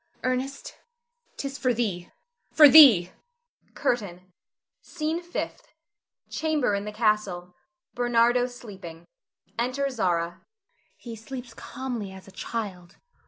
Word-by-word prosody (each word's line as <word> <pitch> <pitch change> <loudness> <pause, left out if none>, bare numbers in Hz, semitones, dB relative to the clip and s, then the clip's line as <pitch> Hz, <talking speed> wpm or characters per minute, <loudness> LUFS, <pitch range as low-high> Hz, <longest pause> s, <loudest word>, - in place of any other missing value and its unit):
Ernest, 255 +2 -3 0.6
'tis 275 0 -5
for 250 -2 +1
thee! 195 -7 -2 0.4
for 300 -1 +8
thee! 245 - +8 0.6
CURTAIN. 185 -6 -3 0.5
SCENE 320 +1 -3
FIFTH. 345 0 -6 0.6
[Chamber 310 -8 0
in 200 0 -2
the 210 - -5
castle. 210 -5 -1 0.4
Bernardo 240 0 +2
sleeping. 195 -9 -11 0.5
Enter 265 +3 -1
Zara.] 180 -9 +1
Zara. 170 +1 -10 0.5
He 235 -2 -9
sleeps 245 +1 -9
calmly 245 -5 -6
as 190 0 -13
a - - -13
child. 190 -3 -6
230 Hz, 110 wpm, -26 LUFS, 190-260 Hz, 0.6 s, for